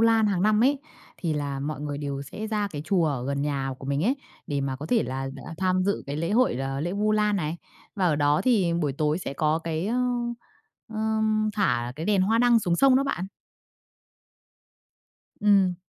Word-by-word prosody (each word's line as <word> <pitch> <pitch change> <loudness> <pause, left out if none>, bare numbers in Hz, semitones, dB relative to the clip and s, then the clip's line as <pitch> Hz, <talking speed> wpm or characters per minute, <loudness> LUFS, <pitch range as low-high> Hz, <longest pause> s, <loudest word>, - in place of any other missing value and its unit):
Lan 225 -1 +4
hàng 190 -3 +1
năm 215 +1 +4
ấy, 280 +1 +3 0.4
thì 165 -3 -2
là 140 -2 -2
mọi 150 +1 -4
người 145 -1 -4
đều 140 -1 -4
sẽ 210 +10 -6
ra 210 -2 -1
cái 145 -3 -5
chùa 170 0 +2
ở 135 -4 -2
gần 140 0 -1
nhà 140 -2 -1
của 135 - -9
mình 140 +2 0
ấy, 255 +6 +2 0.3
để 140 -1 -1
mà 135 -1 -2
có 145 - -7
thể 230 +4 +2
là, 130 +1 -4 0.3
à, 165 - -7
tham 185 -1 +2
dự 200 +1 0
cái 140 +1 -4
lễ 165 +4 -2
hội 250 +4 +3
là 135 +2 -3
lễ 175 +3 -2
Vu 210 +1 +1
Lan 210 -1 +2
này. 160 -2 -2 0.4
Và 195 - 0
ở 155 -4 +2
đó 145 +1 +3
thì 205 -9 +3
buổi 155 -5 0
tối 150 +3 0
sẽ 170 - -5
có 155 +2 +1
cái, 165 +1 -3
ơ, 230 +4 0 0.9
ơ, 225 - -8 0.6
thả 125 - 0
cái 160 +3 -4
đèn 200 -3 +3
hoa 220 +4 +2
đăng 240 -1 +5
xuống 175 -4 0
sông 265 +3 +5
đó 275 - +2
bạn. 190 -9 -2 2.1
Ừm. 195 -3 +4
170 Hz, 210 wpm, -26 LUFS, 145-210 Hz, 2.1 s, đăng